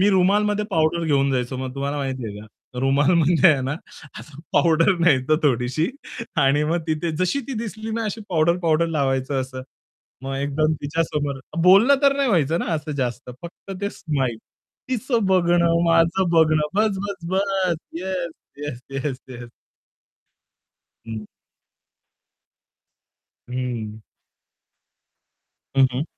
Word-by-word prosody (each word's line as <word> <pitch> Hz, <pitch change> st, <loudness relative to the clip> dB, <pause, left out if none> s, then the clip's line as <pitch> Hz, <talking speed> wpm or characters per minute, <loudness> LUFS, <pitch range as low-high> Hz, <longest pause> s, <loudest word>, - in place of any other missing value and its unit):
मी 195 Hz, -, +5 dB
रुमालमध्ये 205 Hz, +3 st, +2 dB
powder 165 Hz, 0 st, +1 dB
घेऊन 140 Hz, -3 st, +2 dB
जायचो 125 Hz, 0 st, -1 dB
मग 130 Hz, 0 st, -5 dB
तुम्हाला 140 Hz, +1 st, -3 dB
माहिती 130 Hz, -4 st, -3 dB
आहे 105 Hz, 0 st, -8 dB
का. 110 Hz, -, -12 dB, 0.3 s
रुमालमध्ये 160 Hz, +5 st, +4 dB
आहे 135 Hz, -, -1 dB
ना, 135 Hz, -, -2 dB, 0.5 s
असं 150 Hz, -1 st, -13 dB
पावडर 165 Hz, +2 st, +4 dB
न्यायचा 155 Hz, -3 st, +3 dB
थोडीशी 130 Hz, -, +1 dB, 0.5 s
आणि 145 Hz, +2 st, +3 dB
मग 165 Hz, +3 st, 0 dB
तिथे 160 Hz, +1 st, -1 dB
जशी 185 Hz, -, 0 dB
ती -, -, -3 dB
दिसली 220 Hz, 0 st, -5 dB
ना 230 Hz, -1 st, -2 dB
अशी 215 Hz, +1 st, -4 dB
पावडर-पावडर 170 Hz, -1 st, +2 dB
लावायचं 135 Hz, -3 st, 0 dB
असं 130 Hz, 0 st, -6 dB, 0.6 s
मग 135 Hz, 0 st, -4 dB
एकदम 145 Hz, +3 st, 0 dB
तिच्यासमोर 145 Hz, -2 st, -2 dB, 0.2 s
बोलणं 200 Hz, +9 st, +7 dB
तर 280 Hz, 0 st, +4 dB
नाही 275 Hz, -2 st, +1 dB
व्हायचं 165 Hz, -, +2 dB
ना -, -, -3 dB
असं 150 Hz, 0 st, -4 dB
जास्त 125 Hz, -2 st, -3 dB
फक्त 170 Hz, +3 st, -9 dB
ते 200 Hz, -, -1 dB
स्माईल. 135 Hz, -6 st, -2 dB, 0.5 s
तिचं 240 Hz, -3 st, 0 dB
बघणं, 170 Hz, -2 st, +3 dB
माझं 170 Hz, +2 st, +3 dB
बघणं 155 Hz, -2 st, +4 dB
बस, 210 Hz, -1 st, +2 dB
बस, 200 Hz, -4 st, -7 dB
बस. 190 Hz, -2 st, +1 dB, 0.2 s
Yes, 180 Hz, -2 st, -3 dB, 0.3 s
yes, 145 Hz, -4 st, -6 dB
yes, 135 Hz, -1 st, -3 dB
yes. 120 Hz, -2 st, -9 dB, 1.6 s
हं. 110 Hz, -1 st, -6 dB, 2.2 s
हं. 120 Hz, -4 st, -4 dB, 1.8 s
हं, 135 Hz, -1 st, +6 dB
हं. 130 Hz, +4 st, -2 dB
155 Hz, 130 wpm, -22 LUFS, 135-180 Hz, 2.2 s, बोलणं